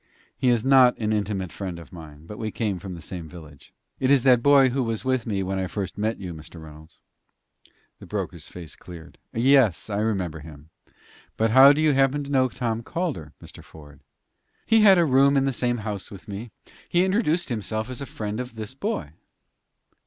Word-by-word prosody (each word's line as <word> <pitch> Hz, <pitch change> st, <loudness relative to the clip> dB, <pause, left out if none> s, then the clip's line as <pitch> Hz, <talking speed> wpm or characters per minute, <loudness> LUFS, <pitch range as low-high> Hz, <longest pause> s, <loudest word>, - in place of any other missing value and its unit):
"He 130 Hz, -, +1 dB
is 120 Hz, -1 st, +1 dB
not 130 Hz, -2 st, +6 dB
an 110 Hz, -1 st, -1 dB
intimate 100 Hz, -4 st, -2 dB
friend 95 Hz, -4 st, -6 dB
of 85 Hz, -1 st, -13 dB
mine, 80 Hz, -3 st, -12 dB
but 105 Hz, +5 st, -10 dB
we 110 Hz, -, -3 dB
came 105 Hz, -4 st, -2 dB
from 90 Hz, 0 st, -7 dB
the 85 Hz, -, -11 dB
same 85 Hz, -2 st, -7 dB
village. 75 Hz, -4 st, -14 dB, 0.3 s
It 130 Hz, -, +1 dB
is 140 Hz, -3 st, +4 dB
that 125 Hz, -3 st, +5 dB
boy 140 Hz, -1 st, +5 dB
who 135 Hz, +2 st, -1 dB
was 115 Hz, -1 st, -3 dB
with 130 Hz, -3 st, 0 dB
me 100 Hz, -3 st, -1 dB
when 95 Hz, +1 st, -2 dB
I 95 Hz, -, -2 dB
first 100 Hz, 0 st, -5 dB
met 110 Hz, +2 st, -2 dB
you, 90 Hz, -3 st, -6 dB
Mr. 80 Hz, +1 st, -11 dB
Reynolds." 80 Hz, +1 st, -14 dB, 1.0 s
The -, -, -12 dB
broker's -, -, -5 dB
face 85 Hz, -5 st, -9 dB
cleared. 85 Hz, -2 st, -13 dB
"Yes, 120 Hz, -, +3 dB
I 100 Hz, -, -1 dB
remember 95 Hz, -7 st, -2 dB
him. 75 Hz, 0 st, -13 dB, 0.7 s
But 110 Hz, 0 st, +1 dB
how 135 Hz, +3 st, +9 dB
do 145 Hz, +2 st, +1 dB
you 155 Hz, -2 st, +4 dB
happen 135 Hz, +2 st, +2 dB
to 140 Hz, -, -8 dB
know 130 Hz, -2 st, +3 dB
Tom 115 Hz, -2 st, -3 dB
Calder, 120 Hz, -, -4 dB
Mr. -, -, -9 dB
Ford?" 75 Hz, -2 st, -15 dB, 0.7 s
"He 225 Hz, -1 st, +4 dB
had 195 Hz, -3 st, +7 dB
a 170 Hz, -, +4 dB
room 140 Hz, 0 st, +4 dB
at 135 Hz, -, +2 dB
the 135 Hz, -, 0 dB
same 120 Hz, 0 st, 0 dB
house 105 Hz, -3 st, -4 dB
with 100 Hz, +1 st, -12 dB
me. 105 Hz, +3 st, -7 dB, 0.4 s
He 175 Hz, +1 st, +3 dB
introduced 180 Hz, -5 st, 0 dB
himself 110 Hz, -1 st, -3 dB
as 130 Hz, +1 st, -7 dB
a 140 Hz, -, -5 dB
friend 105 Hz, 0 st, -5 dB
of 125 Hz, -2 st, -6 dB
this 110 Hz, +1 st, -7 dB
boy." 135 Hz, -, -4 dB
110 Hz, 205 wpm, -24 LUFS, 90-130 Hz, 1.0 s, how